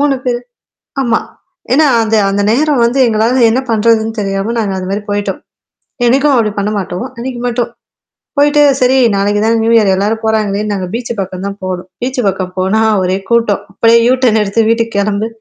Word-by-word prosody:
3 285 -1 +2
பேரு 245 -1 0 0.6
ஆமா. 235 -3 +1 0.5
ஏன்னா, 305 +4 +4 0.2
அந்த 220 0 0
அந்த 200 +1 0
நேரம் 280 +1 +2
வந்து 240 +3 0
எங்களால 230 +3 +1
என்ன 250 +4 +1
பண்றதுன்னு 225 0 +1
தெரியாம 195 +3 -2
நாங்க 210 -3 -1
அதுமாரி 195 +3 -3
போயிட்டோம். 205 0 -2 0.7
என்னைக்கும் 275 +4 +3
அப்பிடி 225 -4 +2
பண்ண 200 +1 -1
மாட்டோம். 185 +3 -4
அன்னக்கி 245 +1 -5
மட்டும். 240 0 -2 0.7
போயிட்டு 290 +1 +4 0.2
சரி 255 0 +3 0.2
நாளைக்கு 205 +1 0
தான் 225 +1 +2
நியூஇயர் 225 -4 +3
எல்லாரும் 210 +4 -1
போறாங்களே! 215 -2 0
நாங்க 190 -2 -3
பீச் 240 +1 -4
பக்கம் 190 0 -5
தான் 200 0 -7
போனோம். 185 0 -5
பீச் 255 +1 -3
பக்கம் 185 -1 -3
போனா 190 +4 +1 0.2
ஒரே 185 +1 0
கூட்டம். 230 -4 +2
அப்பிடியே 230 +3 +4
யூட்டர்ன் 250 -4 +2
எடுத்து 205 +3 0
வீட்டுக்கு 230 -1 0
கெளம்பு. 205 +2 -1
220 Hz, 165 wpm, -13 LUFS, 200-240 Hz, 0.7 s, ஏன்னா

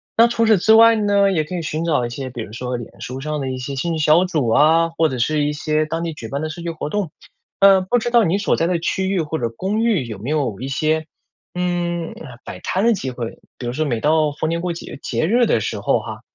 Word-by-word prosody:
那 230 +1 +6
除 235 -1 +1
此 220 -3 +4
之 220 +5 +4
外 230 0 +7
呢， 200 -2 +3
也 155 -4 +1
可 180 +4 -6
以 170 - -3
寻 155 +1 -3
找 160 -7 +1
一 - - -4
些 130 +1 -5
比 120 -2 -7
如 110 0 -8
说 125 +1 -3
脸 120 - -11
书 130 +1 -6
上 150 +1 -3
的 135 - -3
一 130 - -4
些 130 +2 -5
兴 165 +5 -2
趣 160 - -2
小 155 +4 +5
组 155 -9 -1
啊， 160 +6 +4
或 165 -1 +1
者 130 - -4
是 150 +5 +1
一 145 - 0
些 155 +1 0
当 165 +2 -3
地 165 - -3
举 115 -6 -8
办 140 +2 -3
的 155 - -2
社 170 - -8
区 170 - -4
活 160 -2 -5
动。 205 -5 -1 0.5
呃， 195 -1 +6
不 215 +7 +1
知 240 +1 -2
道 235 -2 +5
你 185 +2 +1
所 205 - +1
在 165 - 0
的 180 - +1
区 190 +3 -1
域 190 -3 +1
或 160 0 -3
者 115 - -1
公 195 - -2
寓 205 - +1
有 110 -4 -7
没 120 +8 -5
有 130 -8 -1
一 135 - -4
些， 155 +3 0 0.5
嗯， 175 -2 -1
呃， 125 -6 -11
摆 - - -8
摊 190 +4 -1
的 235 - +5
机 135 -9 -3
会， 120 -2 -6 0.2
比 125 - -7
如 120 - -3
说 155 - -1
每 120 -5 -1
到 155 +1 +2
逢 155 - -2
年 170 0 -1
过 180 - -2
节 165 - -9
节 - - -1
日 235 +7 +3
的 - - +2
时 - - -3
候 - - +1
哈， - - -8
160 Hz, 300 characters per minute, -20 LUFS, 135-185 Hz, 0.5 s, 外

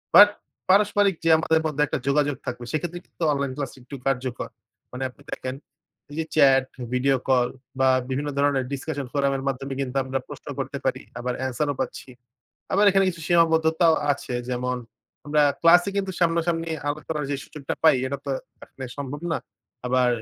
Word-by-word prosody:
But 205 +1 +11 0.4
পারস্পরিক 205 0 +4
যে - - +4
আমাদের 160 0 +2
মধ্যে 150 -1 +1
একটা 140 - -2
যোগাযোগ 145 0 +2
থাকবে 120 -1 -5
সেক্ষেত্রে 175 +3 -2
কিন্তু - - -7
অনলাইন 140 -1 -1
ক্লাস 140 -3 -3
একটু 125 +3 -9
কার্যকর। 130 -2 -1 0.4
মানে 125 +1 -4
আপনি 125 - -19
দেখেন 130 0 -4 0.6
এই - - -8
যে 160 - 0
চ্যাট, 135 -3 +6 0.3
ভিডিও 135 +2 +3
কল 125 -2 +4 0.3
বা 130 0 +5 0.2
বিভিন্ন 140 +3 -1
ধরনের 140 -2 +2
ডিসকাশন 140 0 -4
ফোরাম 140 -1 +2
এর 135 - -6
মাধ্যমে 135 +1 -4
কিন্তু 130 -1 -4
আমরা 130 +1 -2
প্রশ্ন - - -10
করতে - - -3
পারি। - - 0 0.2
আবার 125 +1 -2
আনসারও 145 +3 -1
পাচ্ছি। 130 - -5 0.6
আবার 205 +2 +4
এখানে 195 0 +4
কিছু 170 -2 -10
সীমাবদ্ধতাও 165 -1 +4 0.2
আছে। 130 -2 -5 0.2
যেমন 125 0 -1 0.5
আমরা 150 0 +3 0.2
ক্লাসে 175 +3 +6
কিন্তু 195 -1 -1
সামনাসামনি 165 -1 +1 0.2
আলাপ 145 +1 -2
করার 150 -2 -1
যে 140 - 0
সুযোগটা 145 -2 -5
পাই 160 - +7
এটা 140 +1 -3
তো - - -1 0.3
এখানে 130 - -9
সম্ভব 145 0 -5
না। - - +1 0.5
আবার 125 0 +3
145 Hz, 170 wpm, -25 LUFS, 130-165 Hz, 0.6 s, But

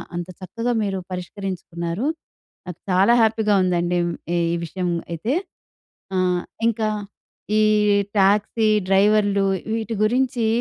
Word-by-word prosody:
అంత 175 0 -4
చక్కగా 230 +6 -3
మీరు 195 -2 -2
పరిష్కరించుకున్నారు. 180 - -4 0.6
నాకు 180 -1 -8
చాలా 190 +5 +4
హ్యాపీగా 220 -1 +2
ఉందండిమ్ 175 -1 +1 0.4
ఈ - - +1
విషయం 180 +2 -3 0.2
అయితే. 190 - -2 0.8
ఆహ్, 180 -1 +1 0.3
ఇంకా 225 -1 +1 0.7
ఈ - - +4 0.6
ట్యాక్సీ 205 +3 +3 0.2
డ్రైవర్‌లు, 200 0 +3 0.3
వీటి 225 0 -3
గురించీ 245 0 +1
195 Hz, 100 wpm, -22 LUFS, 180-220 Hz, 0.8 s, చాలా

